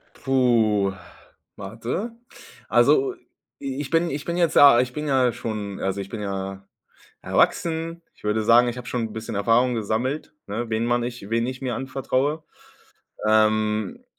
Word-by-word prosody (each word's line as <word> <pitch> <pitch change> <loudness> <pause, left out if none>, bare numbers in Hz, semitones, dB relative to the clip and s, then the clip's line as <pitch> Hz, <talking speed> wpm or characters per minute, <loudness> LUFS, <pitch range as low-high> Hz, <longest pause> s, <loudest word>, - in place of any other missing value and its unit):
Puh, 115 -7 +2 0.6
warte. 115 - -4 0.6
Also, 400 -1 +4 0.5
i 135 -1 -4
ich 145 - -6
bin 165 +1 +2
ich 145 0 -5
bin 170 0 -2
jetzt, 170 -3 +2
ja 140 -4 +8
ich 125 0 0
bin 150 +2 -4
ja 130 -3 +3
schon 105 -4 -5
also 95 +1 -2
ich 95 - -8
bin 110 -1 -6
ja 95 -1 -5 0.5
erwachsen. 165 0 0
Ich - - -25
würde 105 +1 0
sagen, 120 +2 +5
ich 120 0 -3
habe 125 -1 -8
schon 120 -1 -2
'n - - -11
bisschen 110 0 -6
Erfahrung 115 +5 +2
gesammelt, 120 +8 -2
ne? 110 +3 -4
Wen 110 +1 0
man 120 0 +1
nich 120 -4 -6
wen 115 +1 +1
ich 130 +1 -6
mir 125 -3 -2
anvertraue. 135 +3 -1 0.8
Ähm 110 - +1
120 Hz, 160 wpm, -24 LUFS, 110-135 Hz, 0.8 s, ja